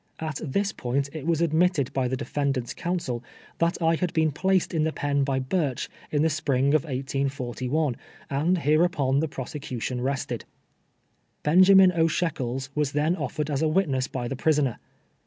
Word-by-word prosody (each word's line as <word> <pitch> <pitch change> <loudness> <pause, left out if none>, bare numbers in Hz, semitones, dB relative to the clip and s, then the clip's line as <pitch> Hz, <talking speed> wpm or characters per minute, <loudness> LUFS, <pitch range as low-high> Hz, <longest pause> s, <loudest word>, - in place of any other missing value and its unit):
At 155 -3 -4
this 200 +7 0
point 135 +3 -2
it 155 -1 -6
was 165 -1 +2
admitted 165 -3 +2
by 130 -2 +1
the 130 +1 -2
defendant's 135 -3 -2
counsel, 170 -9 -3 0.4
tliat 170 +2 +1
I 165 0 +4
had 175 +1 -1
been 160 -1 +2
placed 190 +5 +1
in 160 -2 +1
the 160 - +1
pen 145 -2 0
by 135 -1 0
Burch 135 0 -1 0.2
in 150 0 +1
the 160 - +3
spring 140 -2 +1
of 155 - +4
181:1, 135 0 -2 0.3
and 155 +7 +1
hereupon 150 -4 +2
the 160 - 0
prosecution 130 -3 -5
rested. 135 +1 -2 1.0
Benjamin 185 +4 +7
O. 165 -2 +2
Shekels 135 -6 -2
was 150 -2 -1
then 150 +4 +2
offered 155 -4 -3
as 140 0 0
a 160 - +3
witness 150 -6 +1
by 125 -2 -4
the 135 - -3
prisoner. 145 -3 +1
145 Hz, 165 wpm, -26 LUFS, 135-165 Hz, 1.0 s, Benjamin